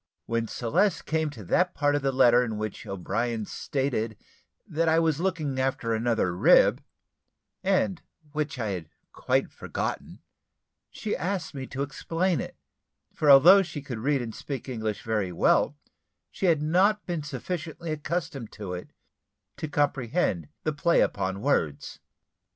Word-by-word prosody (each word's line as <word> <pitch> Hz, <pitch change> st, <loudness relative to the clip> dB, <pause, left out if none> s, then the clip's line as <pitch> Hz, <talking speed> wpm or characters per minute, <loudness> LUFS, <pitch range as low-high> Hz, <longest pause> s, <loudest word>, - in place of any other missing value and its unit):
When 115 Hz, 0 st, -1 dB
Celeste 130 Hz, -, 0 dB
came 160 Hz, -1 st, 0 dB
to 120 Hz, -8 st, -10 dB
that 180 Hz, -, +1 dB
part 145 Hz, 0 st, +2 dB
of 145 Hz, -, +1 dB
the 135 Hz, 0 st, +1 dB
letter 125 Hz, -2 st, +5 dB
in 110 Hz, -3 st, -3 dB
which 110 Hz, 0 st, -5 dB
O'Brien 110 Hz, +4 st, -2 dB
stated 120 Hz, -6 st, -2 dB, 0.5 s
that 165 Hz, +1 st, 0 dB
I 160 Hz, -, +4 dB
was 160 Hz, -2 st, +2 dB
looking 160 Hz, -7 st, -1 dB
after 130 Hz, -3 st, 0 dB
another 110 Hz, -6 st, 0 dB
rib, -, -, +5 dB, 0.8 s
and 190 Hz, -2 st, +1 dB, 0.3 s
which 150 Hz, -1 st, -2 dB
I 110 Hz, -4 st, -2 dB
had 90 Hz, -5 st, -5 dB, 0.2 s
quite -, -, 0 dB
forgotten, -, -, -5 dB, 0.7 s
she 215 Hz, -, -3 dB
asked 180 Hz, 0 st, -3 dB
me 135 Hz, -2 st, -6 dB
to 135 Hz, +1 st, -3 dB
explain 165 Hz, +3 st, -1 dB
it; -, -, -7 dB, 0.6 s
for 150 Hz, -, +1 dB
although 170 Hz, +9 st, +9 dB
she 150 Hz, -6 st, -6 dB
could 125 Hz, -5 st, -5 dB
read 135 Hz, +2 st, +1 dB
and 115 Hz, -2 st, -6 dB
speak 135 Hz, +1 st, -6 dB
English 110 Hz, -4 st, -3 dB
very 105 Hz, -5 st, -1 dB
well, 140 Hz, -, +2 dB, 0.5 s
she 190 Hz, -, -1 dB
had 160 Hz, -3 st, +3 dB
not 190 Hz, +7 st, +3 dB
been 170 Hz, -3 st, -2 dB
sufficiently 160 Hz, +3 st, -5 dB
accustomed 150 Hz, -6 st, -3 dB
to 100 Hz, -4 st, -6 dB
it 90 Hz, -, -8 dB, 0.6 s
to 155 Hz, -, -4 dB
comprehend 140 Hz, -, 0 dB, 0.2 s
the 155 Hz, -, 0 dB
play 170 Hz, +4 st, +3 dB
upon 95 Hz, +1 st, -1 dB
words. 80 Hz, -, 0 dB
140 Hz, 150 wpm, -27 LUFS, 115-160 Hz, 0.8 s, although